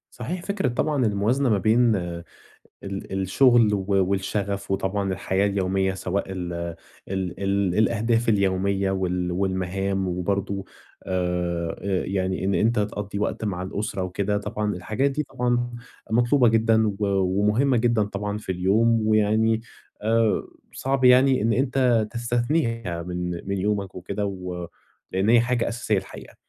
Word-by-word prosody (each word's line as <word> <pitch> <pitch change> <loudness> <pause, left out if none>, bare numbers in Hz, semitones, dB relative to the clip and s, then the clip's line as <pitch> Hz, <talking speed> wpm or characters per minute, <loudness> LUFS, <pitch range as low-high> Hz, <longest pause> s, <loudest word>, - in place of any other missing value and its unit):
صحيح 170 +9 -4
فكرة 200 -5 0
طبعًا 135 0 0
الموازنة 110 +7 +1
ما 105 -4 +3
بين 110 +2 +3
ال 85 -2 -4 1.0
الشغل 115 +2 +4
و 100 - -1 0.2
والشغف 100 +1 -2
وطبعًا 95 0 -1
الحياة 95 +2 0
اليومية، 95 -1 0
سواء 95 +1 -2
ال 90 -2 -4 0.6
ال 95 -1 -3
ال 100 -2 +1
الأهداف 115 +1 +2
اليومية 100 -1 +1
وال 90 -2 -1
والمهام 95 +1 -1
وبرضو 95 +2 -2 0.4
آآ، 90 -2 -2
آآ 95 -2 -1
يعني 95 -1 -1
إن 100 0 +1
أنت 115 +3 +2
تقضِّي 105 -1 -3
وقت 105 - -2
مع 90 -4 -2
الأسرة 95 0 -3
وكده، 100 +3 -1
طبعًا 105 0 -2
الحاجات 110 +10 -1
دي 145 +2 -1
طبعًا 120 -3 -1 0.4
مطلوبة 120 +3 +4
جدًا 110 0 +3
و 100 -2 -2 0.4
ومهمة 115 +6 +3
جدًا 115 -2 +2
طبعًا 105 0 -3
في 95 -3 -4
اليوم، 110 +6 +2
ويعني 110 +1 +3 0.4
آآ، 115 0 +2 0.3
صعب 135 0 -1
يعني 130 0 +6
إن 115 +1 +2
أنت 125 -4 +2
تستثنيها 120 - -1
من 90 0 -4 0.2
من 100 0 -1
يومك 100 -1 -1
وكده 100 +3 -3
و 90 -3 -5 0.5
لأن 95 +3 +1
هي 120 -1 +7
حاجة 120 0 0
أساسية 115 -3 -1
الحقيقة. 95 - -10
100 Hz, 140 wpm, -24 LUFS, 95-115 Hz, 1.0 s, هي